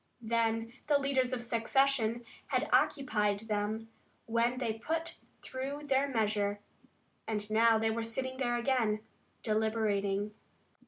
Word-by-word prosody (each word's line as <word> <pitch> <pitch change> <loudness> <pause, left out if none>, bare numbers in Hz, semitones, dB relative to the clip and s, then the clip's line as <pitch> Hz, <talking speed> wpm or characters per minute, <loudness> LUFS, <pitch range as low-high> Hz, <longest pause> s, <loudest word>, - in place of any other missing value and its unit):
Then 225 0 0
the 295 -1 +5
leaders 270 -2 +1
of 250 -2 -3
secession 235 0 +1 0.2
had - - 0
occupied 210 -7 +2
them, 220 +1 -2 0.3
when 235 +2 +1
they 235 -4 -1
put 320 +9 -3 0.3
through 270 +3 -4
their 275 0 +2
measure, 210 -4 0 0.7
and 210 -2 0
now 225 +1 +5
they 220 0 +1
were 230 +1 -1
sitting 260 +3 -4
there 240 -2 0
again, 235 -4 +1 0.4
deliberating. 215 -2 0
230 Hz, 120 wpm, -32 LUFS, 215-260 Hz, 0.7 s, the